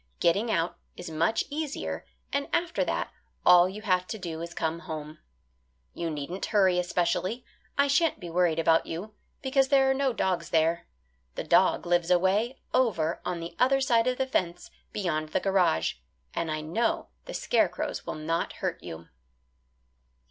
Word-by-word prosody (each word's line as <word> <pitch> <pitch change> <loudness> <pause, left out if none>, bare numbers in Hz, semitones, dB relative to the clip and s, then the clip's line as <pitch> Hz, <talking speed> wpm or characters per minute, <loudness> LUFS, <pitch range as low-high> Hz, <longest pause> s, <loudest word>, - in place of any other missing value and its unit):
Getting 200 +7 +2
out 170 -4 0 0.2
is 175 -2 -7
much 165 +8 +1
easier 300 -1 -4 0.3
and 280 0 0
after 345 0 +1
that - - -2 0.3
all 180 0 +7
you 210 +3 -8
have 185 -3 +1
to 220 - -4
do 165 -4 -5
is 170 - -5
to - - -14
come 160 +1 -1
home. 155 -1 -7 0.7
You 170 -1 -3
needn't 155 +5 -4
hurry 190 -4 +3
especially. 180 +6 -1 0.3
I 280 - +5
sha'n't 305 +4 +2
be 175 - -7
worried 170 -1 +2
about 165 0 +3
you, 190 +7 -6 0.3
because 270 0 +3
there 270 -1 +4
are - - +4
no 270 0 +1
dogs 190 -6 -1
there 165 +1 +1 0.5
the - - -3
dog - - +3
lives 175 0 +2
away 195 +8 +2 0.2
over 180 -11 +1
on 175 -2 -3
the 170 - -7
other 270 +2 +4
side 235 -3 +3
of 250 0 +1
the 265 - +1
fence 180 -8 -2 0.2
beyond 155 -6 -2
the 155 - +1
garage 185 - +2 0.4
and 165 - -2
I 155 0 -2
know 220 +10 -1 0.2
the - - -7
scarecrows - - 0
will - - -5
not 165 +2 -2
hurt - - -3
you." 80 +1 -8
180 Hz, 170 wpm, -28 LUFS, 165-235 Hz, 0.7 s, all